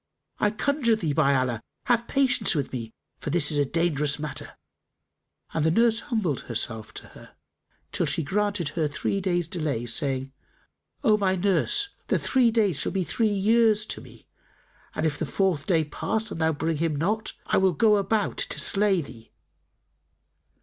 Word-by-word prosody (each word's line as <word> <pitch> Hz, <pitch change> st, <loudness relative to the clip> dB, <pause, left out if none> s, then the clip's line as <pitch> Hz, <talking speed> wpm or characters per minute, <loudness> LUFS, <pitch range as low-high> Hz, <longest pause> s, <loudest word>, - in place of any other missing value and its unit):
"I 210 Hz, -, +3 dB
conjure 235 Hz, +2 st, +1 dB
thee, 165 Hz, -9 st, -2 dB
by 140 Hz, -2 st, +3 dB
Allah, 125 Hz, -3 st, 0 dB, 0.2 s
have 235 Hz, -2 st, +1 dB
patience 260 Hz, -9 st, +3 dB
with 140 Hz, -3 st, -2 dB
me, 115 Hz, -3 st, -5 dB, 0.3 s
for -, -, -5 dB
this 160 Hz, 0 st, +4 dB
is 145 Hz, -, +2 dB
a 145 Hz, -, +3 dB
dangerous 150 Hz, -2 st, 0 dB
matter!" 150 Hz, 0 st, -6 dB, 1.0 s
And 160 Hz, -, 0 dB
the 160 Hz, -, +3 dB
nurse 225 Hz, +5 st, +3 dB
humbled 210 Hz, -, -1 dB
herself 110 Hz, -2 st, -3 dB
to -, -, -7 dB
her, -, -, -15 dB, 0.6 s
till -, -, 0 dB
she 165 Hz, -, 0 dB
granted 205 Hz, -1 st, -1 dB
her 155 Hz, 0 st, -1 dB
three 175 Hz, +6 st, -2 dB
days' 175 Hz, -3 st, 0 dB
delay, 155 Hz, -9 st, -2 dB
saying, 135 Hz, +2 st, -1 dB, 0.7 s
"O 215 Hz, -2 st, +4 dB
my 190 Hz, -2 st, +1 dB
nurse, 200 Hz, -, +1 dB, 0.2 s
the -, -, +2 dB
three 255 Hz, -3 st, +2 dB
days 205 Hz, -, +1 dB
will -, -, -2 dB
be 190 Hz, -1 st, 0 dB
three 225 Hz, +5 st, 0 dB
years 215 Hz, +1 st, +3 dB
to -, -, -4 dB
me; -, -, -16 dB, 0.7 s
and 155 Hz, -, -1 dB
if 150 Hz, -2 st, -1 dB
the 160 Hz, -, -1 dB
fourth 175 Hz, -4 st, 0 dB
day 165 Hz, -4 st, +3 dB
pass 215 Hz, +9 st, -3 dB
and 165 Hz, -, -5 dB
thou 160 Hz, 0 st, +3 dB
bring 160 Hz, +1 st, -2 dB
him 160 Hz, -1 st, 0 dB
not, 210 Hz, +9 st, -1 dB
I -, -, +1 dB
will 190 Hz, -1 st, +4 dB
go 210 Hz, +5 st, +4 dB
about 205 Hz, +1 st, 0 dB
to -, -, -2 dB
slay 195 Hz, -3 st, +3 dB
thee." 115 Hz, -4 st, -13 dB
175 Hz, 175 wpm, -26 LUFS, 145-215 Hz, 1.0 s, this